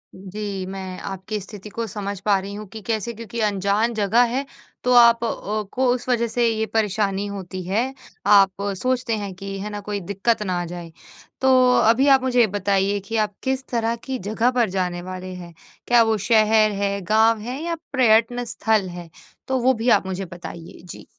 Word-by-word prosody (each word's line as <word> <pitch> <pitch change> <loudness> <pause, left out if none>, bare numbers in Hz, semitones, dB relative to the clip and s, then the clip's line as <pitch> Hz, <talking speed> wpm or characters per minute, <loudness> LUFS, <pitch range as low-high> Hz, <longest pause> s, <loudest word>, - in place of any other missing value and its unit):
जी, 195 0 -5
मैं 190 -1 -6
आपकी 195 +2 -5
स्थिति 210 +1 -10
को 230 +2 -4
समझ 200 -1 -5
पा 200 -1 +3
रही 200 +1 -7
हूँ 210 +1 -7
कि 220 - -8
कैसे 225 +1 -1
क्योंकि 230 +1 -7
अनजान 205 +3 +1
जगह 220 +3 +3
है, 270 +3 -2 0.4
तो 250 0 +2
आप 235 -1 +6
अ, 215 -1 -2
को 260 +1 +1
उस 250 0 -5
वजह 235 -1 +2
से 235 +1 +1
ये 220 -1 0
परेशानी 205 -2 0
होती 190 -2 -6
है, 235 +7 0 0.3
आप 200 -2 +6 0.3
सोचते 255 -3 0
हैं 200 -2 -5
कि 195 +1 -6
है 210 +2 -5
ना 205 0 -5
कोई 205 0 -4
दिक्कत 200 +4 -1
ना 180 -3 -1
आ - - -4
जाए। 170 -1 -8 0.5
तो 265 - +3 0.3
अभी 235 +6 +4
आप 270 -2 +6
मुझे 250 -1 +1
ये 230 - +6
बताइए 200 0 0
कि 225 - -4
आप 210 -2 0
किस 265 0 -1
तरह 230 -1 0
की 265 -1 -3
जगह 230 +4 +1
पर 240 -5 +1
जाने 180 -2 -2
वाले 185 0 -7
हैं? 175 -2 -10 0.3
क्या 240 -1 +6
वो 220 -1 +1
शहर 215 -1 +4
है, 200 0 0
गाँव 220 +4 +3
है 250 +5 -5
या 340 0 -2 0.2
प्रयत्न 245 -1 +3
स्थल 220 -4 0
है? 175 -1 -9 0.4
तो 260 -1 0
वो 260 +2 +3
भी 230 +2 -1
आप - - +4
मुझे 190 +1 -3
बताइए? 170 -1 -10
जी। - - -10
215 Hz, 200 wpm, -22 LUFS, 195-235 Hz, 0.5 s, आप